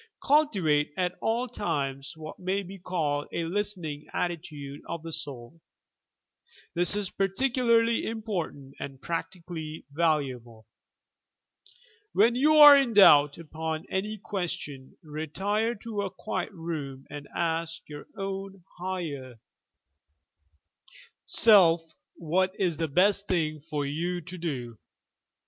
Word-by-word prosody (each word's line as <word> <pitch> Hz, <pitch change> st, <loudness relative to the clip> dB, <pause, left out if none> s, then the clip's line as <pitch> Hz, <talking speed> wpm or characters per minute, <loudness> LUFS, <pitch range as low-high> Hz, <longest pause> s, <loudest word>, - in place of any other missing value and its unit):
Cultivate 190 Hz, -, +3 dB
at 180 Hz, -1 st, 0 dB
all 235 Hz, +3 st, 0 dB
times 140 Hz, -, -3 dB
what 155 Hz, -1 st, -9 dB
may 190 Hz, +2 st, -1 dB
be 195 Hz, +1 st, -10 dB
called 155 Hz, -5 st, -1 dB
a 170 Hz, -, -2 dB
listening 170 Hz, -5 st, -3 dB
attitude 150 Hz, -5 st, -4 dB
of 170 Hz, -1 st, -4 dB
the 165 Hz, -, -6 dB
soul. 140 Hz, +1 st, -5 dB, 1.1 s
This 175 Hz, +3 st, +2 dB
is 205 Hz, -3 st, -2 dB
particularly 230 Hz, +3 st, +2 dB
important 185 Hz, -, -4 dB
and 135 Hz, -2 st, -7 dB
practically 165 Hz, -2 st, -5 dB
valuable. 130 Hz, -8 st, -1 dB, 1.5 s
When 225 Hz, +4 st, +5 dB
you 295 Hz, +5 st, +4 dB
are 295 Hz, -1 st, +12 dB
in 270 Hz, -4 st, +3 dB
doubt 145 Hz, -7 st, +7 dB
upon 160 Hz, 0 st, -4 dB
any 210 Hz, +3 st, -2 dB
question, 165 Hz, -9 st, -5 dB
retire 190 Hz, +9 st, -1 dB
to 210 Hz, 0 st, -4 dB
a 200 Hz, -, -2 dB
quiet 185 Hz, 0 st, -4 dB
room 155 Hz, -7 st, -6 dB
and 145 Hz, -1 st, -7 dB
ask 165 Hz, -1 st, -2 dB
your 145 Hz, -1 st, -9 dB
own 195 Hz, -1 st, -5 dB, 0.2 s
higher 160 Hz, -9 st, -4 dB, 1.9 s
self 170 Hz, -7 st, +5 dB, 0.2 s
what 185 Hz, +3 st, 0 dB
is 175 Hz, -5 st, 0 dB
the 165 Hz, 0 st, -1 dB
best 200 Hz, +6 st, +3 dB
thing 155 Hz, -4 st, 0 dB
for 145 Hz, -2 st, -1 dB
you 170 Hz, +5 st, -2 dB
to 185 Hz, +3 st, -9 dB
do. 125 Hz, -9 st, -4 dB
170 Hz, 115 wpm, -28 LUFS, 150-195 Hz, 1.9 s, are